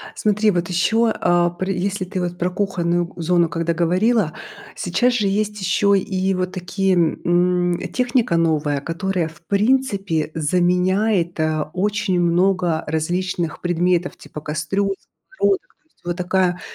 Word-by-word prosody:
Смотри, 210 Hz, 0 st, +2 dB
вот 175 Hz, -1 st, -1 dB
ещё, 220 Hz, +6 st, +2 dB
а, 175 Hz, 0 st, +2 dB
пры 185 Hz, +3 st, -3 dB
если 195 Hz, +1 st, -2 dB
ты 185 Hz, 0 st, -4 dB
вот 175 Hz, 0 st, -3 dB
про 180 Hz, 0 st, 0 dB
кухонную 175 Hz, -3 st, -1 dB
зону 170 Hz, 0 st, +2 dB
когда 165 Hz, +1 st, -1 dB
говорила, 180 Hz, +2 st, +2 dB, 0.4 s
сейчас 245 Hz, +8 st, +1 dB
же 215 Hz, -4 st, +1 dB
есть 210 Hz, +1 st, -1 dB
ещё 200 Hz, +2 st, +2 dB
и 190 Hz, 0 st, 0 dB
вот 185 Hz, 0 st, -2 dB
такие, 190 Hz, +1 st, 0 dB
м, 175 Hz, +1 st, +1 dB
техника 245 Hz, -8 st, +1 dB
новая, 155 Hz, -3 st, +1 dB
которая, 170 Hz, +2 st, -2 dB
в 160 Hz, +1 st, -17 dB
принципе, 200 Hz, -, 0 dB
заменяет, 180 Hz, +3 st, +1 dB
а, 155 Hz, -1 st, -1 dB
очень 195 Hz, -1 st, 0 dB
много 175 Hz, -1 st, +1 dB
различных 170 Hz, +2 st, -2 dB
предметов 175 Hz, 0 st, 0 dB
типа 150 Hz, -, -10 dB
кастрюль, 160 Hz, +7 st, -1 dB, 0.4 s
сковородок, 395 Hz, -5 st, +2 dB, 0.2 s
то -, -, -44 dB
есть. -, -, -38 dB
Вот 175 Hz, 0 st, -2 dB
такая, 180 Hz, -1 st, 0 dB
180 Hz, 140 wpm, -21 LUFS, 170-195 Hz, 0.4 s, Смотри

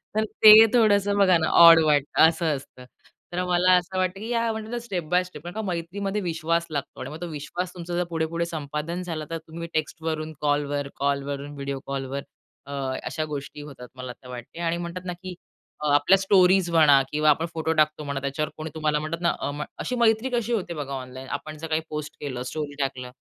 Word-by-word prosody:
तर 215 Hz, -, +2 dB, 0.2 s
ते 215 Hz, -, +12 dB, 0.2 s
थोडंसं 205 Hz, -3 st, +3 dB
बघा 185 Hz, -3 st, +5 dB
ना 160 Hz, -, 0 dB
ऑड 165 Hz, -1 st, +10 dB
वाटतं, 145 Hz, -2 st, +2 dB
असं 165 Hz, +1 st, -1 dB
असतं. 130 Hz, -2 st, -11 dB, 0.5 s
तर 180 Hz, +1 st, -1 dB
मला 180 Hz, +1 st, +3 dB
असं 180 Hz, +1 st, -3 dB
वाटतं, 185 Hz, +1 st, 0 dB
की 220 Hz, -, -6 dB
या 230 Hz, -1 st, +1 dB
म्हटलं 220 Hz, +1 st, -6 dB
तर 240 Hz, -, -2 dB
स्टेप 185 Hz, -7 st, -3 dB
बाय 180 Hz, +1 st, +3 dB
स्टेप. 165 Hz, -4 st, -12 dB
कारण 175 Hz, -, -7 dB
का 220 Hz, -, -2 dB
मैत्रीमध्ये 195 Hz, +2 st, -3 dB
विश्वास 165 Hz, -1 st, -1 dB
लागतो 145 Hz, -3 st, -5 dB
आणि 130 Hz, -, -5 dB
मग 155 Hz, +3 st, -9 dB
तो 175 Hz, -, -3 dB
विश्वास 170 Hz, +4 st, -5 dB
तुमचा 175 Hz, -1 st, -7 dB
जर 180 Hz, -, +1 dB
पुढे-पुढे 165 Hz, +1 st, -1 dB
संपादन 155 Hz, +2 st, -4 dB
झालं 160 Hz, -3 st, -5 dB
तर 165 Hz, -, -3 dB
तुम्ही 165 Hz, +1 st, -8 dB
टेक्स्टवरून 155 Hz, 0 st, -3 dB
कॉलवर, 145 Hz, -1 st, 0 dB
कॉलवरून 140 Hz, +1 st, -2 dB
व्हिडिओ 140 Hz, -1 st, -4 dB
कॉलवर, 135 Hz, 0 st, -4 dB, 0.4 s
अ, 140 Hz, -, -10 dB, 0.3 s
अशा 155 Hz, -, -3 dB
गोष्टी 145 Hz, 0 st, -6 dB
होतात 130 Hz, -4 st, -10 dB
मला 130 Hz, -1 st, -7 dB
तर 125 Hz, -, -17 dB
वाटते. 125 Hz, +6 st, -9 dB
आणि 170 Hz, 0 st, 0 dB
म्हणतात 175 Hz, +1 st, -6 dB
ना, 180 Hz, -, -3 dB
की 180 Hz, +1 st, -9 dB, 0.5 s
अ, -, -, 0 dB
आपल्या 145 Hz, +7 st, +5 dB
स्टोरीज 190 Hz, -2 st, +4 dB
म्हणा 150 Hz, -4 st, +6 dB
किंवा 150 Hz, 0 st, +2 dB
आपण 160 Hz, +3 st, +3 dB
फोटो 160 Hz, 0 st, -1 dB
टाकतो 155 Hz, 0 st, +1 dB
म्हणा, 140 Hz, -1 st, -3 dB
त्याच्यावर 140 Hz, +2 st, -2 dB
कोणी 155 Hz, +1 st, -5 dB
तुम्हाला 150 Hz, -1 st, 0 dB
म्हणतात 160 Hz, +3 st, -4 dB
ना, 170 Hz, -, +3 dB
अ, -, -, -2 dB
म 145 Hz, +1 st, -4 dB, 0.2 s
अशी 250 Hz, -, -2 dB
मैत्री 225 Hz, +2 st, +3 dB
कशी 235 Hz, 0 st, 0 dB
होते 180 Hz, -6 st, -2 dB
बघा 140 Hz, -3 st, -5 dB
ऑनलाईन, 130 Hz, 0 st, -7 dB
आपण 155 Hz, 0 st, -10 dB
जर 165 Hz, +1 st, -6 dB
काही 160 Hz, 0 st, 0 dB
पोस्ट 150 Hz, 0 st, -5 dB
केलं, 130 Hz, -4 st, -4 dB
स्टोरी 150 Hz, -2 st, -4 dB
टाकलं, 130 Hz, -2 st, -3 dB
160 Hz, 210 wpm, -25 LUFS, 145-180 Hz, 0.5 s, ते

